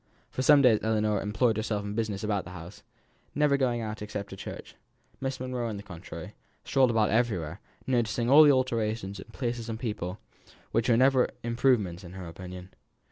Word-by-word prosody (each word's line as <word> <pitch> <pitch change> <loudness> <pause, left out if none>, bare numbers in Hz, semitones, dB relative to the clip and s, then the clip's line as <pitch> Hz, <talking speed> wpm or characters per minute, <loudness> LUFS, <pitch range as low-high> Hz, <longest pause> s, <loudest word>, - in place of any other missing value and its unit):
For - - -3
some 145 +1 +6
days 115 -4 +6
Ellinor 110 -2 +1
employed 110 +2 +1
herself 110 -2 -1
in 100 - -4
business 110 -2 -2
in - - -2
the 100 -4 -1
house, 85 +1 -10 0.5
never 150 -1 +3
going 125 -4 +1
out 110 -1 -5
except 105 -1 -5
to - - -6
church. - - -8 0.5
Miss 135 0 -3
Monro, 125 -2 -3
on 105 - -4
the 100 - -8
contrary, 90 -5 -9 0.3
strolled 130 -2 +3
about 110 -2 +2
everywhere, 100 -7 0 0.3
noticing 120 -2 0
all 140 +5 +8
the 150 -2 +8
alterations 110 -6 -1
in 105 - -11
place 120 -2 -3
and 110 0 -4
people, 105 -5 -4 0.5
which 115 +2 +1
were 115 - +5
never 130 0 +4
improvements 115 -7 +1
in 90 0 -10
her 95 -2 -7
opinion. 90 +2 -9
110 Hz, 185 wpm, -28 LUFS, 100-125 Hz, 0.5 s, all